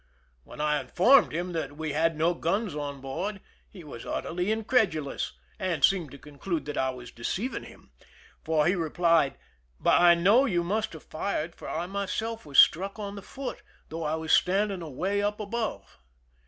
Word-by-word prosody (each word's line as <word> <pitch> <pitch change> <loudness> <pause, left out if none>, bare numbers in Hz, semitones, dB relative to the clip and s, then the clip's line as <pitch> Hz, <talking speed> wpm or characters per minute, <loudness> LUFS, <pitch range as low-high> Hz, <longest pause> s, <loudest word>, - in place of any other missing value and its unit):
When - - -13
I 150 0 +1
informed 255 +10 +5
him 175 +3 -3
that 145 -3 -4
we 155 -2 -3
had 165 +1 +1
no 165 +3 +2
guns 185 +4 -1
on 145 -2 -5
board, 195 +10 -4 0.3
he 185 -4 -12
was 130 -6 -9
utterly 180 +4 -2
incredulous, 210 - 0 0.3
and 170 -7 +3
seemed 180 -6 0
to 140 - -11
conclude 150 +3 -5
that 150 - -5
I 130 - +1
was 125 -2 -8
deceiving 195 - -3
him, - - -16 0.5
for 155 -2 +2
he 175 - +3
replied: 165 -3 +2 0.2
" - - -39
But - - +4
I 175 -1 +7
know 205 +10 +5
you 175 -9 +1
must 215 +4 -1
have 160 - -10
fired, 165 -1 -3
for - - -9
I 165 +2 -2
myself 200 +2 -3
was 140 - -3
struck 195 +5 +5
on 200 -2 -5
the 200 - -7
foot, 270 +6 -7 0.3
though 165 +1 -5
I 155 +1 0
was 160 0 -1
standing 195 0 +2
away 180 +7 -2
up 205 +1 -1
above." 220 - -4
170 Hz, 180 wpm, -28 LUFS, 150-200 Hz, 0.5 s, I